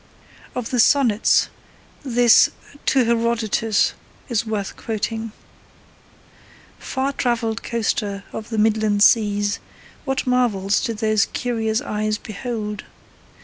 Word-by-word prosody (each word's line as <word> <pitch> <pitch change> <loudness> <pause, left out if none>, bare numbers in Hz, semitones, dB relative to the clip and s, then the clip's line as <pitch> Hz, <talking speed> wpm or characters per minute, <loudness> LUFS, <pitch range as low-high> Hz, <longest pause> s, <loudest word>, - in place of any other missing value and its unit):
Of 250 -3 -4
the 250 - 0
sonnets, 235 -4 +4 0.5
this 245 -4 +5 0.4
To 265 -2 +4
Herodotus 230 -2 +1 0.4
is 235 -1 -1
worth 205 -3 -3
quoting: 225 0 -4 1.5
Far 270 +1 -2
travelled 235 -3 -1
coaster 210 -3 -2
of 220 - -6
the 225 - -3
midland 215 -1 +2
seas, 205 -2 +3 0.4
What 270 -2 -2
marvels 225 -6 +1
did 230 -4 -2
those 215 -2 +2
curious 225 -3 -1
eyes 215 0 -2
behold! 215 -1 -5
225 Hz, 105 wpm, -21 LUFS, 210-240 Hz, 1.5 s, this